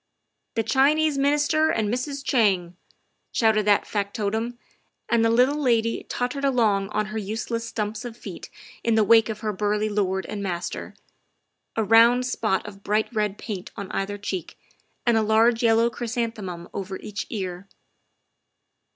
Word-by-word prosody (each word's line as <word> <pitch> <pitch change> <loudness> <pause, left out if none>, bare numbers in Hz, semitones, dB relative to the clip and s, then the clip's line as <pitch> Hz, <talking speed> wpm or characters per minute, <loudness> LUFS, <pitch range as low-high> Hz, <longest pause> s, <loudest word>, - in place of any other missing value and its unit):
" - - -54
The 225 - +1
Chinese 290 +4 +3
Minister 295 +3 +3
and 220 -2 0
Mrs. 275 +5 -3
Chang!" 190 -9 +2 0.6
shouted 215 -2 +2
that 205 -1 +4
factotum, 215 +3 -2 0.5
and 235 -1 +2
the 225 - +4
little 255 +6 +3
lady 230 -4 +1
tottered 250 +3 -2
along 220 -8 +2
on 215 0 -1
her 220 - -1
useless 225 +3 -3
stumps 215 +1 -3
of 240 -2 -7
feet - - -9 0.3
in 230 -1 +2
the 220 - +4
wake 225 +1 +5
of 215 -1 -5
her 215 -2 -2
burly 210 +2 0
lord 190 -2 0
and 210 -1 -5
master, 180 -3 -4 0.8
a 225 - +1
round 230 +4 +5
spot 215 -6 0
of 200 -1 -10
bright 215 +4 0
red 210 -2 -1
paint 195 -5 -6
on 200 - -6
either 200 +1 -2
cheek 195 -3 -5 0.5
and 235 -2 +4
a - - +3
large 225 +2 +3
yellow 230 0 +4
chrysanthemum 225 -8 -4
over 190 -1 -4
each 210 -1 -6
ear. 185 -3 -5
220 Hz, 155 wpm, -24 LUFS, 205-240 Hz, 0.8 s, wake